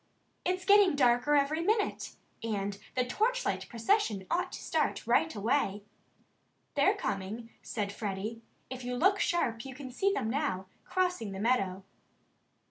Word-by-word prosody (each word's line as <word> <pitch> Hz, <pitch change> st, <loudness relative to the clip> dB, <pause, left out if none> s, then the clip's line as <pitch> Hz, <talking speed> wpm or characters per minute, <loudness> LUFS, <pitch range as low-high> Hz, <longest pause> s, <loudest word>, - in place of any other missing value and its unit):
"It's 365 Hz, +1 st, -1 dB
getting 400 Hz, -4 st, +6 dB
darker 250 Hz, +2 st, +4 dB
every 290 Hz, +3 st, +2 dB
minute. 420 Hz, +4 st, 0 dB, 0.3 s
And 200 Hz, -3 st, -2 dB, 0.2 s
the 255 Hz, -1 st, +2 dB
torchlight 485 Hz, -, 0 dB
procession 230 Hz, -, +1 dB
ought 360 Hz, +2 st, 0 dB
to -, -, -5 dB
start -, -, -1 dB
right 320 Hz, -, +2 dB
away." 210 Hz, -2 st, 0 dB, 0.9 s
"They're 395 Hz, -, +4 dB
coming," 215 Hz, -, -4 dB
said 205 Hz, -3 st, -3 dB
Freddie. 210 Hz, +2 st, -4 dB, 0.3 s
"If 255 Hz, -1 st, -5 dB
you 250 Hz, 0 st, -3 dB
look 385 Hz, +9 st, +3 dB
sharp 235 Hz, -10 st, 0 dB
you 265 Hz, -2 st, -8 dB
can 260 Hz, -1 st, -8 dB
see 390 Hz, +10 st, +1 dB
them 395 Hz, -, -1 dB
now, 230 Hz, -7 st, -1 dB, 0.2 s
crossing 360 Hz, -, -1 dB
the 190 Hz, -, -6 dB
meadow." 195 Hz, -5 st, +1 dB
250 Hz, 140 wpm, -31 LUFS, -, 0.9 s, getting